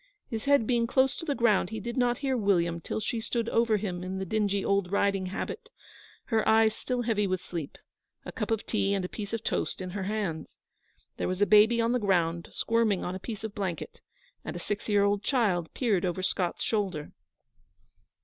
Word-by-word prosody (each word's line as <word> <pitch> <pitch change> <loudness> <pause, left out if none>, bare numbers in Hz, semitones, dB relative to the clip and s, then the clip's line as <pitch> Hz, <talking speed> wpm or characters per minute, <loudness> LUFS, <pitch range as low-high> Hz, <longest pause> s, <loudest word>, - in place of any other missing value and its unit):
His 225 +1 -3
head 280 -5 +4
being 235 -1 +2
close 265 +1 +3
to 330 - -6
the 285 -3 0
ground, 220 -7 +3
he 220 0 -4
did 235 +3 -5
not 245 -1 +2
hear 270 -2 -1
William 175 -6 +1
till - - -3
she 225 +1 -2
stood 230 0 -1
over 230 -2 +3
him 180 -4 -4
in 185 +1 -4
the 190 - -3
dingy 200 0 0
old 200 -2 +1
riding 200 -2 +1
habit, 460 - -5 0.5
her 225 -3 +1
eyes 220 0 +5
still 250 +2 -2
heavy 215 -3 +1
with 185 -1 0
sleep, 170 -5 -6 0.5
a - - -6
cup - - -4
of 225 -1 -1
tea 200 -2 +1
and 190 -2 -1
a - - -2
piece 205 +1 -6
of 225 -1 -3
toast - - -1
in 185 -1 -5
her 190 0 -3
hands. 195 -6 -3 0.6
There - - -1
was 185 0 -2
a - - +5
baby 215 +3 +6
on 230 0 +2
the 250 - +2
ground, 170 -5 +1
squirming 230 -4 +1
on 180 - -3
a 185 - -5
piece 220 +1 -6
of 220 -2 -4
blanket, 185 -6 -4 0.4
and - - -5
a - - -4
six 205 +4 -4
year 205 -1 +4
old 200 0 +2
child 205 - +1
peered 215 -8 +1
over 185 0 -1
Scott's 185 -2 -1
shoulder. 190 -9 -1
205 Hz, 210 wpm, -28 LUFS, 185-230 Hz, 0.6 s, baby